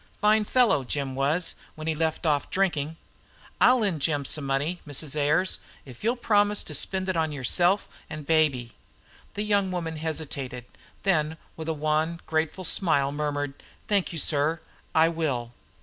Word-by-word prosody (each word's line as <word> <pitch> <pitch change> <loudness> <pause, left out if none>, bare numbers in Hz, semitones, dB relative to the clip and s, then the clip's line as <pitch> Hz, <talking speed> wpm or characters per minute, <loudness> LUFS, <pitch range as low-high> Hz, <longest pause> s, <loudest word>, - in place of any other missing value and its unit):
"Fine 210 +1 +4
fellow, 235 - +3
Jim 135 +1 -2
was, 145 +6 +1 0.2
when 155 - -7
he 160 - +1
left 160 +2 -1
off 145 -3 +1
drinking. 165 -5 0 0.6
I'll 250 -1 +6
lend 185 -8 0
Jim 145 -2 0
some 145 +1 -2
money, 145 +6 -1
Mrs. 145 0 -1
Ayers, 155 +6 +2 0.3
if 125 - -12
you'll 235 +3 +2
promise 210 -3 +2
to - - -6
spend 190 -1 +1
it 185 - 0
on 160 -2 +1
yourself 175 +8 +2 0.2
and 150 -1 -7
baby." 140 -7 +2 0.6
The 205 - -1
young 200 -3 +1
woman 165 -3 -3
hesitated, 140 -6 -4 0.4
then 160 -5 +1 0.2
with 160 0 -5
a - - +1
wan, 155 +2 0
grateful 160 +3 -1
smile 145 -7 +2
murmured, 145 -1 -2 0.3
"Thank 200 -3 +1
you, 170 - -5
sir, 155 +2 +1 0.4
I 160 +1 +6
will." 140 -8 -2
160 Hz, 160 wpm, -26 LUFS, 145-180 Hz, 0.6 s, I'll